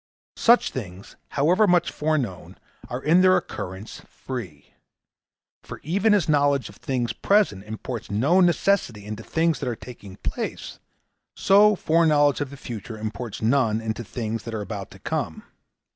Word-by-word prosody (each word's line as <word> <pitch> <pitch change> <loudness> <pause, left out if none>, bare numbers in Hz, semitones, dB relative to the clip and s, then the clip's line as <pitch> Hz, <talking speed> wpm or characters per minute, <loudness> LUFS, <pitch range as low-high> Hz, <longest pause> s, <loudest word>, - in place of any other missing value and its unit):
Such 235 +1 +4
things, 100 -3 -8
however 180 +9 +3
much 175 -1 +3
foreknown, 145 - -2 0.3
are 125 +2 -5
in 170 +4 +5
their 185 0 +6
occurrence 95 +4 -6
free. 95 - -8 0.9
For - - -9
even 200 +7 +2
as 200 - +1
knowledge 145 -4 +2
of 105 - -15
things 125 -3 -2
present 195 - +2
imports 110 +2 -6
no 135 - +3
necessity 175 - +1
into 105 +1 -6
things 165 +6 0
that - - -2
are 120 - -2
taking 105 -5 -11
place, - - -5 0.6
so 205 +2 +5
foreknowledge 155 -5 +3
of 145 - -2
the 140 - -10
future 110 -2 -7
imports 110 +1 -6
none 115 -2 +2
into 115 +1 -4
things 115 0 -4
that 115 0 -6
are 105 - -3
about 100 -1 -6
to - - -14
come. - - -4
125 Hz, 150 wpm, -24 LUFS, 110-165 Hz, 0.9 s, their